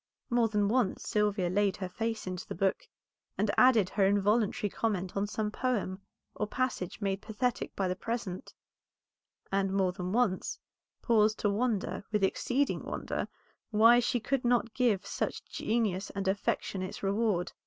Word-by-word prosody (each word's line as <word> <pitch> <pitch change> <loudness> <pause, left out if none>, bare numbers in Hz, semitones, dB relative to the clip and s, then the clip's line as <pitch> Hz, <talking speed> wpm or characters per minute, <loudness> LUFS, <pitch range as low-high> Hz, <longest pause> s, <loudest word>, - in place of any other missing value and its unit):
More 235 -1 +4
than 210 -2 +1
once 235 -2 0
Sylvia 210 -3 +1
laid 195 +1 +1
her 185 - -3
face 225 +4 -3
into 185 -1 -5
the - - -5
book, 195 - 0 0.5
and 205 +1 +1
added 240 -7 +6
her 200 - +1
involuntary 205 +1 +2
comment 190 -5 -2
on 200 +1 0
some 210 0 -2
poem 210 -6 -1 0.3
or 210 - -2
passage 245 -6 -2
made 195 -1 -1
pathetic 235 +3 -2
by 195 - 0
the 180 - -1
present; 215 -3 -4 1.0
and 195 0 +1
more 190 -2 +2
than 180 0 -4
once 220 -4 +1 0.5
paused 215 -2 +3
to 205 - +2
wonder, 215 -2 -1
with 210 -2 +1
exceeding 260 +8 +1
wonder, - - -3 0.4
why 230 +2 +6
she 245 +1 +1
could 265 +3 -1
not 240 -2 +2
give 240 -7 +1
such - - -3
genius 210 -4 -1
and 195 -1 -4
affection 195 0 -1
its 185 - -6
reward. 200 -2 +1
210 Hz, 155 wpm, -30 LUFS, 195-230 Hz, 1.0 s, added